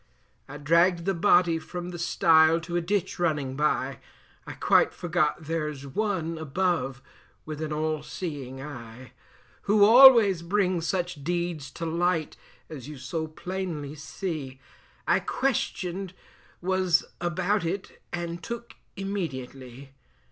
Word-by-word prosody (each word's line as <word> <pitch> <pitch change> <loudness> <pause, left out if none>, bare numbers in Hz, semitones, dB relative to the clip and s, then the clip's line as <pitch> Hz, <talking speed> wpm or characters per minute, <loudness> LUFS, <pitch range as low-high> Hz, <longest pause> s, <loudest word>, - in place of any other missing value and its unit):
I 145 - -7
dragged 170 +4 +3
the 195 - +1
body 170 -2 +4
from 175 +2 -7
the 175 -1 -7
stile 165 -1 +4
to 170 +2 -5
a 175 - +2
ditch 195 +1 -2
running 150 -6 0
by, 135 -3 0 0.5
I - - -6
quite - - +3
forgot 175 -2 0
there's 150 -3 -3
One 165 0 -2
above 155 -4 -1 0.4
with 155 0 -6
an 155 -1 -3
all 155 0 -1
seeing 145 -6 -6
eye, 120 -4 -10 0.6
Who 205 0 +6
always 230 -6 +8
brings 180 -2 0
such 180 -5 -2
deeds 170 -3 -2
to 165 - -5
light, 165 -1 0 0.3
as 140 -5 -9
you 150 -1 -8
so 160 +5 -4
plainly 170 -3 -5
see, 150 -3 -6 0.5
I 170 +2 +4
questioned 195 -5 -2 0.5
was 185 -2 +2 0.2
about 180 +4 0
it 185 +4 -5
and 170 0 -4
took 235 +6 -7 0.2
immediately. 135 -9 -6
170 Hz, 125 wpm, -27 LUFS, 150-185 Hz, 0.6 s, always